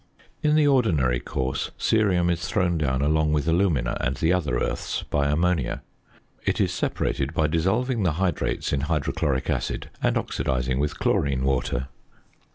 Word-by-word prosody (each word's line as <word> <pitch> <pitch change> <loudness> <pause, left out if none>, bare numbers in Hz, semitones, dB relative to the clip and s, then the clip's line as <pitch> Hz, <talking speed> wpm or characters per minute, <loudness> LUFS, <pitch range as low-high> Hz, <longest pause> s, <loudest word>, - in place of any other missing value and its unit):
In 150 0 +3
the 155 -1 +4
ordinary 80 - +2
course 65 +1 -3
cerium 90 -6 +2
is 85 0 -2
thrown 90 -5 +1
down 65 -2 0
along 75 +1 +2
with 75 0 0
alumina 80 -8 +1
and 65 0 -1
the 80 +2 +2
other 75 -9 0
earths - - -2
by 70 -1 0
ammonia. 80 -1 0 0.6
It - - 0
is - - +1
separated 70 +3 -2
by 80 - +2
dissolving 105 +10 +1
the 90 -5 +2
hydrates 90 -3 -1
in 70 - +1
hydrochloric 75 -3 -1
acid, - - -3
and - - +2
oxidizing 65 0 -1
with 75 +1 -1
chlorine 70 -2 +1
water. 65 -1 0
75 Hz, 155 wpm, -25 LUFS, 65-90 Hz, 0.6 s, the